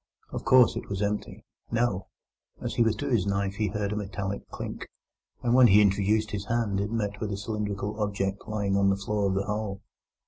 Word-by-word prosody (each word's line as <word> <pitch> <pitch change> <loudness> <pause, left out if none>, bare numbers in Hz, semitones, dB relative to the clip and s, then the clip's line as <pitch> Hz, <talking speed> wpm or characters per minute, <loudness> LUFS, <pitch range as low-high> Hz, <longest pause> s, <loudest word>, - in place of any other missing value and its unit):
Of - - -4
course 130 -4 +6
it - - -6
was 100 +1 -1
empty. 105 +1 -3 0.2
No! 115 -5 0 0.5
As - - -3
he - - +1
withdrew 115 +2 +2
the 100 - -2
knife 100 0 -1
he 110 -2 +1
heard 105 0 -2
a - - -3
metallic 100 -1 -4
clink, - - -6 0.6
and 120 -1 +2
when 130 -1 +8
he 100 -1 +7
introduced 105 +2 +2
his 100 -1 -3
hand 115 -4 0
it 100 +1 -1
met 105 -2 -2
with 105 -1 -2
a 100 - -2
cylindrical 105 0 -3
object 100 -1 -2
lying 100 -2 0
on 100 0 +4
the 95 - +2
floor 100 0 0
of 95 - 0
the 100 - +1
hole. 105 -2 -3
105 Hz, 205 wpm, -27 LUFS, 100-110 Hz, 0.6 s, when